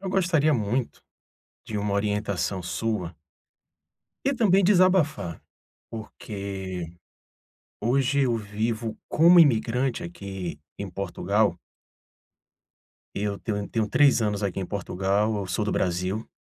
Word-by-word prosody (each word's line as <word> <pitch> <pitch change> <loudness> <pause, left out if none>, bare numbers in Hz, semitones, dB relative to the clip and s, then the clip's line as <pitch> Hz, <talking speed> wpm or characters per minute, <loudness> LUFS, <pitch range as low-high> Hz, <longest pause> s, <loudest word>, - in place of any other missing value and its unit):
eu 195 - -5
gostaria 170 -5 +2
muito 115 +2 -2 0.6
de 110 - -4
uma 100 0 -1
orientação 100 -2 -1
sua 90 -1 -3 1.1
e 275 +1 +2
também 200 -5 +4
desabafar, 180 - +3 0.5
porque 100 -5 -6 1.0
hoje 135 +4 +2
eu 125 -3 +2
vivo 110 +2 -3
como 170 +3 +6
imigrante 125 -3 +3
aqui 90 -2 -6 0.2
em 100 - -5
Portugal 100 +1 0 1.6
e 100 - -3
eu 100 -1 -2
tenho 105 -3 -3
eu 100 - -5
tenho 110 -2 -1
3 140 +1 +4
anos 105 -1 -1
aqui 100 -1 -1
em 95 - -3
Portugal, 100 +2 0
eu 100 -2 -3
sou 90 +4 -1
do 105 - -1
Brasil 90 +4 -1
105 Hz, 120 wpm, -26 LUFS, 100-130 Hz, 1.6 s, como